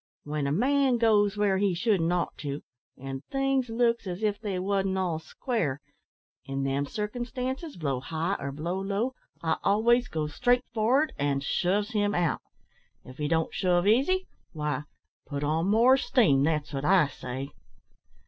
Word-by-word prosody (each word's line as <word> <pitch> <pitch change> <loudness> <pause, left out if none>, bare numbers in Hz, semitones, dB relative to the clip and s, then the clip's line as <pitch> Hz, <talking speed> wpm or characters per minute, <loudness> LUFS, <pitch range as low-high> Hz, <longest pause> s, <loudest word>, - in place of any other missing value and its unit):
When 150 -1 -2
a - - 0
man 260 - +3
goes 210 -3 +3
where 200 -2 +2
he 195 -3 +2
shouldn't 185 -4 +1
ought 180 -1 -1
to, 145 0 -4 0.3
an' 135 0 -6
things 270 -2 0
looks 235 -1 +1
as 180 +3 -5
if 210 -1 0
they 200 -4 -2
wasn't 195 0 0
all 175 -4 -1
square, 160 - -2 0.6
in 135 0 -3
them 135 +1 0
circumstances, 250 - -4
blow 140 -6 -1
high 160 +7 -2
or 140 0 -4
blow 170 +6 -3
low, 205 +6 -1 0.3
I 160 -1 +1
always 235 +4 +3
goes 150 -5 -3
straight 245 - +2
for'ard 245 +8 +2
an' 140 -1 +1
shoves 195 - 0
him 205 -2 +1
out. 175 -2 +1 0.6
If 130 +1 -12
he 150 - 0
don't 160 +1 0
shove 180 -1 +2
easy, 275 - +3 0.3
why, 150 -2 -2 0.4
put 140 -1 -4
on 160 +4 +1
more 235 +6 +5
steam 200 - +3
that's 150 -2 -1
wot 135 0 -3
I 180 +1 +5
say." 135 0 -6
190 Hz, 160 wpm, -28 LUFS, 150-230 Hz, 0.6 s, more